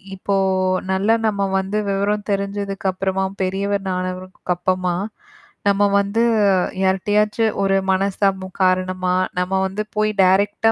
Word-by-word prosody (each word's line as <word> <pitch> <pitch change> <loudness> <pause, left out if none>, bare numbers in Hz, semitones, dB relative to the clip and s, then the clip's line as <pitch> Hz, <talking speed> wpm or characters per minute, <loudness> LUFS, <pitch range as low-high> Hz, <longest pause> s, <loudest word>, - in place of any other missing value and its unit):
இப்போ 195 +1 -2 0.6
நல்லா 200 +4 +2
நம்ம 200 -2 -1 0.2
வந்து 190 +2 -2
விவரம் 205 +2 -1
தெரிஞ்சதுக்குப்புறமா 195 -1 -2 0.2
பெரியவர் 195 +1 -1
ஆனவர்க்கப்பரமா 185 0 -2 0.7
நம்ம 200 0 +3 0.2
வந்து 200 +3 0 0.6
யார்ட்டியாச்சு 210 +4 +1 0.2
ஒரு 195 0 +2 0.2
மனச்சிரமம் 190 0 0
காரணமா, 185 0 +1 0.2
நம்ம 180 +1 -2
வந்து 195 +3 -3
போய் 215 0 +1
டைரெக்ட் 200 +4 +2
ஆ - - +4
195 Hz, 105 wpm, -20 LUFS, 185-200 Hz, 0.7 s, ஆ